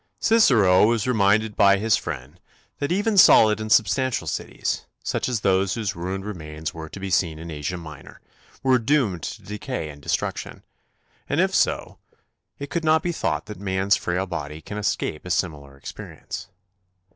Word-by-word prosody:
Cicero 110 - +5
was 115 -2 +1
reminded 110 -2 +2
by 100 0 +5
his 110 +1 +2
friend 75 +1 -6 0.4
that 145 - -2
even 205 +2 +2
solid 110 - +7
and 110 0 -5
substantial 115 +5 +2
cities, - - -3 0.2
such - - -1
as 120 -4 -1
those 95 0 +2
whose 110 -5 -3
ruined 95 +3 -4
remains 80 -6 -6
were 80 -1 -8
to 95 - -9
be 95 0 -5
seen 85 -3 +1
in 85 +1 -8
Asia 75 +4 -4
Minor, 80 -5 -11 0.4
were 130 -1 +4
doomed 115 - +1
to - - -6
decay 105 - -5
and 75 -1 -11
destruction; - - -3 0.7
and - - 0
if - - +2
so, - - 0 0.6
it 140 0 -7
could 165 +2 -1
not 160 +1 +3
be 175 - 0
thought 80 - -2
that 105 -2 -9
man's 95 0 +1
frail 90 +2 -2
body 75 -4 -5
can 105 +6 -7
escape 100 -6 -2
a 90 - -8
similar 75 -6 -2
experience. - - -8
95 Hz, 170 wpm, -23 LUFS, 85-115 Hz, 0.7 s, solid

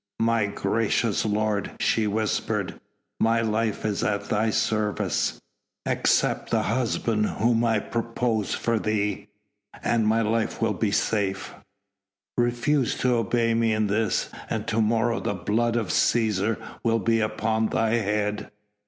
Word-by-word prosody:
"My 115 -2 +2
gracious 105 +2 0
lord!" 105 -1 0
she 110 -2 +2
whispered, 105 +1 -1 0.4
"my 115 0 +3
life 110 -1 -1
is 105 -2 -1
at 100 -1 0
thy 110 +2 +1
service." 110 -1 0 0.5
"Accept - - +1
the - - +1
husband 115 -2 0
whom 115 +1 +1
I 115 -2 +2
propose 115 0 -1
for 115 -1 0
thee... 105 -2 -1 0.6
and 115 -2 +2
my 115 +1 +3
life 110 +1 -1
will 110 -1 +1
be 105 +3 0
safe.... 100 -1 -1 0.8
Refuse 120 +3 +1
to 125 -1 +2
obey 115 0 +1
me 115 -1 +2
in 110 0 +1
this 105 0 0 0.2
and 110 -1 -2
to 115 0 +1
morrow 115 +2 +1
the 100 - -2
blood 110 +6 0
of 110 -6 -1
Cæsar 110 +2 +2 0.3
will 115 -1 +2
be 115 +1 +1
upon 110 0 0
thy 110 0 0
head...." 105 -1 -1
110 Hz, 135 wpm, -25 LUFS, 105-115 Hz, 0.8 s, my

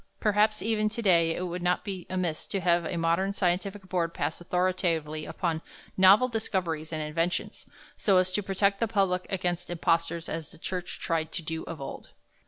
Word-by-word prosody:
Perhaps 215 0 +2
even 215 -1 +1
to 220 +2 -4
day 170 -4 +4
it - - -3
would 180 0 -3
not 180 0 +1
be 190 -4 -5
amiss 180 -4 -2
to 195 - -2
have 175 -1 +2
a 170 - -2
modern 170 +4 +1
scientific 190 +1 -1
board 170 -3 -1
pass - - -2
authoritatively 175 -4 0
upon 165 -3 -2 0.3
novel 195 +6 +7
discoveries 180 -9 -2
and 155 -1 -2
inventions, 165 +3 -2 0.3
so 195 -3 +3
as 185 0 +3
to 205 - 0
protect 195 0 +1
the 230 - +1
public 195 -4 +1
against 180 -2 -2
impostors 165 -1 0
as 160 -1 -4
the - - -14
Church 180 +2 -4
tried 160 -1 -1
to 170 - -3
do 160 0 -3
of 165 - -7
old. 135 - -7
180 Hz, 185 wpm, -28 LUFS, 165-195 Hz, 0.3 s, novel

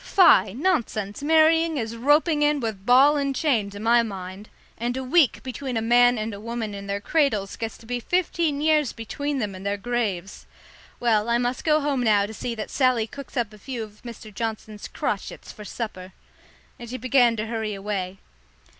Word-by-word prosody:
"Tie, 215 - +6
nonsense; 235 - -1
marrying 320 +1 +3
is 230 -2 -3
roping 295 +5 +3
in 295 0 +3
with 220 -5 -5
ball 275 +4 +6
and 275 -1 -1
chain, 245 -10 +1
to 200 0 -9
my 235 +2 +4
mind. 195 -2 -7 0.3
And 240 +2 -3
a 265 - -3
week 275 +1 +3
between 260 -1 -4
a - - 0
man 245 +1 +5
and 215 0 -3
a 200 - -8
woman 225 -1 -4
in 200 0 -7
their 200 0 -2
cradles 215 -6 0
gets 225 -1 -5
to - - -17
be 245 +1 -3
fifteen 330 -1 0
years 305 -3 +2
between 285 +6 -4
them 210 -6 -2
and 185 0 -9
their 200 +1 -1
graves. 200 -5 -3 0.5
Well, 225 -2 +2
I 235 - +3
must 245 +1 -2
go 305 -1 +3
home 280 -3 0
now 210 -4 +3
to 215 - -8
see 235 +2 -4
that 215 - -6
Sally 255 -4 +2
cooks 280 +4 -10
up 230 -3 -1
a 210 - -14
few 245 0 -5
of 210 -1 -13
Mr. 230 -3 -10
Johnson's 215 -1 -5
crotchets 200 - -4
for 210 - -11
supper." 190 -4 -6 0.7
And 240 -1 -9
she 255 - -4
began 250 -2 +3
to 215 0 -3
hurry 220 -2 -3
away. 195 -2 -4
235 Hz, 195 wpm, -24 LUFS, 210-275 Hz, 0.7 s, Tie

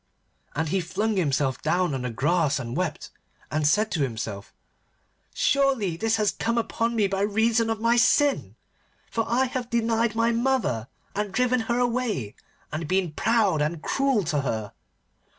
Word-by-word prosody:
And 160 +2 -1
he 190 +3 +1
flung 205 +6 -1
himself 140 -6 0
down 175 0 +1
on 135 - -2
the 125 - -2
grass 150 +6 +1
and 120 -2 -5
wept, 180 -2 -3 0.4
and 150 -1 +1
said 210 +7 +2
to 160 - -1
himself, 110 -6 -4 0.8
'Surely 265 -11 +1
this 225 +5 +1
has 210 -2 +2
come 230 +1 -2
upon 230 0 -1
me 215 -3 +3
by 195 0 -1
reason 225 +2 +2
of 225 -1 -1
my 230 +2 +3
sin. 285 +4 +3 0.6
For 225 -1 0
I 250 +3 +2
have 250 -1 -4
denied 230 -1 +1
my 230 +1 +2
mother, 235 - 0 0.3
and 205 -1 -2
driven 250 +3 +2
her 235 - +2
away, 235 - -1 0.4
and 155 +1 -4
been 185 -1 +1
proud, 205 -3 +2
and 155 +1 -2
cruel 270 -6 +1
to 150 -3 0
her. 110 -6 -3
205 Hz, 165 wpm, -25 LUFS, 155-235 Hz, 0.8 s, me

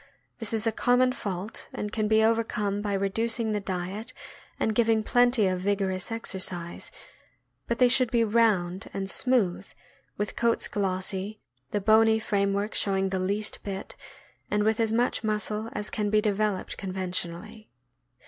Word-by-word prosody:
This 225 -3 0
is 225 -1 +1
a 225 - +3
common 250 +3 +3
fault, 200 -3 -5
and 210 - -4
can 215 -1 0
be 220 0 +4
overcome 215 -3 0
by 205 -1 -2
reducing 220 +3 0
the 210 - 0
diet 195 +5 -4 0.5
and 220 - +1
giving 225 -1 +2
plenty 245 -1 +3
of 185 -1 0
vigorous 190 0 -1
exercise; 185 -6 -3 0.8
but 235 - -1
they 250 - +6
should 255 -1 +4
be 230 0 +2
round 210 -4 +1
and 195 0 -1
smooth, 205 -8 +1 0.5
with 205 0 -3
coats 235 -1 +2
glossy, 190 +1 -2 0.3
the 205 - -1
bony 220 +2 +5
frame 200 -2 0
work 200 +2 -2
showing 195 -1 +2
the 190 0 -1
least 200 +3 -1
bit, 195 -1 -6 0.5
and 210 0 +1
with 220 +1 +1
as 225 -1 +2
much 235 0 +1
muscle 215 +1 -2
as 210 - -4
can 210 -1 -1
be 215 +1 +4
developed 210 -2 -1
conven 185 -1 -4
iently. 185 +5 -4
210 Hz, 160 wpm, -27 LUFS, 195-225 Hz, 0.8 s, they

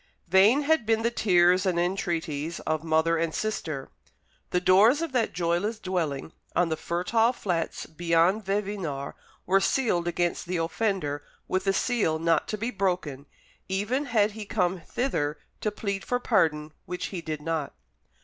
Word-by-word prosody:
Vain 200 - +5
had 320 -1 +3
been 225 0 +2
the 235 - +2
tears 180 -4 +4
and 180 -3 +1
entreaties 170 -4 -2
of 155 0 -2
mother 160 +1 +2
and 165 -1 -1
sister. 160 -10 -3 0.6
The 180 - +1
doors 200 - +5
of 330 - -3
that 245 -3 +1
joyless 175 +6 0
dwelling 170 -8 -2 0.2
on 175 -1 +3
the 160 - 0
fertile 185 +9 +1
flats 175 -8 -2
beyond 170 +5 +2
Vevinord 195 -8 -3 0.3
were 195 +2 +4
sealed 190 -7 +1
against 175 0 -1
the 180 0 -1
offender 165 -4 -1 0.3
with 185 +1 -1
a 195 - +4
seal 205 -8 +1
not 165 -1 +1
to 215 - -3
be 230 +4 -2
broken, 180 - -2 0.4
even 215 +9 0
had 220 -4 +2
he 215 +1 -7
come 185 -3 -1
thither 155 - -2 0.2
to 215 - 0
plead 200 -2 -4
for 245 - -1
pardon, 155 -10 +1
which 180 0 -4
he 175 - -3
did 155 -2 -4
not. 160 -3 -2
180 Hz, 160 wpm, -27 LUFS, 165-215 Hz, 0.6 s, Vain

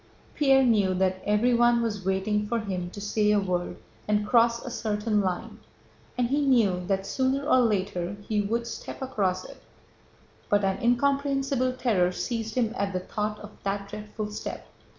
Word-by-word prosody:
Pierre 270 -2 +4
knew 205 -6 +3
that 185 0 0
everyone 240 +3 +4
was 210 -4 -3
waiting 200 +3 0
for 235 +1 0
him 185 -5 -4
to 205 - -9
say 210 +1 +1
a 210 - +4
word 180 -2 -2 0.3
and 210 0 +1
cross 235 +1 +3
a 250 - -5
certain 210 -2 0
line, 185 -2 -3 0.6
and 245 -1 +1
he 285 +2 +1
knew 225 -10 +3
that 195 -1 0
sooner 265 +6 0
or 255 - +5
later 200 -5 0
he 210 -1 +1
would 230 +4 -1
step 235 - -7
across 190 -8 -1
it, - - -12 0.9
but 205 0 +3
an 195 +5 0
incomprehensible 275 +1 +1
terror 205 -9 +1
seized 225 +2 -3
him 235 -3 +1
at 200 -3 -2
the 185 - 0
thought 210 +3 -3
of 210 0 -10
that 200 0 -3
dreadful 210 0 -6
step. 210 - -6
210 Hz, 170 wpm, -27 LUFS, 195-240 Hz, 0.9 s, or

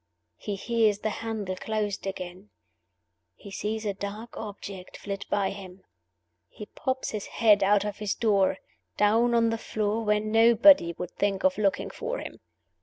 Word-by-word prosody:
He 205 - -4
hears 220 0 +1
the 215 - -1
handle 215 -5 -4
closed 210 0 -3
again; 180 - -7 0.9
he 200 - -12
sees 215 +2 -3
a 205 - 0
dark 205 +4 -7
object 200 -3 -8
flit 200 -1 -6
by 200 -1 +1
him; 190 -1 -10 0.7
he 210 - -9
pops 260 +4 -3
his 215 -2 -5
head 210 -3 +4
out 200 +1 +3
of 205 -1 -4
his 210 -2 -1
door, 200 -5 +2 0.4
down 230 +3 +3
on 230 -1 +3
the 225 - -2
floor 215 +1 -2
where 210 -1 +2
nobody 225 - +5
would 180 +1 -6
think 200 -1 -1
of 190 +2 +2
looking 200 -2 0
for - - -4
him. - - -8
210 Hz, 160 wpm, -27 LUFS, 195-225 Hz, 0.9 s, nobody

